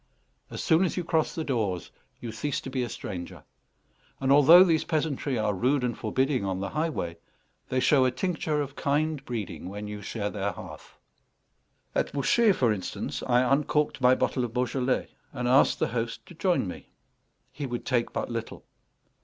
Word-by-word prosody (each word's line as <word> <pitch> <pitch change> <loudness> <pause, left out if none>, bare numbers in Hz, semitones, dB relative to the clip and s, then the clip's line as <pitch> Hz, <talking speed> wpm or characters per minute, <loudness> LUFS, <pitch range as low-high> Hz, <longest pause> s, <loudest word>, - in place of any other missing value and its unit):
As - - -5
soon 165 +1 +4
as 185 - -1
you 180 - 0
cross 160 -2 0
the 160 - -2
doors 110 - -2 0.3
you 120 - -6
cease 130 +6 -2
to 135 - -7
be 130 -1 -1
a 120 - -2
stranger; 90 -4 -7 0.8
and 135 0 +1
although 150 +6 +9
these 165 -4 +2
peasantry 150 -4 -1
are 105 -1 +1
rude 125 +7 +1
and 120 -1 -1
forbidding 130 +2 0
on 95 -1 -2
the 100 - -3
highway, 150 - -2 0.5
they 130 - +1
show 135 +1 +4
a - - +4
tincture 155 +2 -1
of 140 -1 -5
kind 150 0 0
breeding 110 -7 -5
when 105 +2 -6
you 105 0 -6
share 105 0 -3
their 100 -1 -2
hearth. - - -11 1.0
At - - -1
Bouchet, 205 - +3
for 120 -10 +2
instance, 95 -3 -4
I 125 0 +4
uncorked 145 +2 +1
my 125 0 +6
bottle 130 - 0
of 120 -1 -5
Beaujolais, 125 +1 0 0.2
and 125 -2 -2
asked 130 +3 +4
the - - 0
host 115 -1 -3
to - - -13
join 175 - +1
me. 90 - -8 0.6
He 145 -1 -5
would 120 -1 -5
take 120 -4 0
but - - -2
little. 115 -1 -5
130 Hz, 180 wpm, -27 LUFS, 115-150 Hz, 1.0 s, although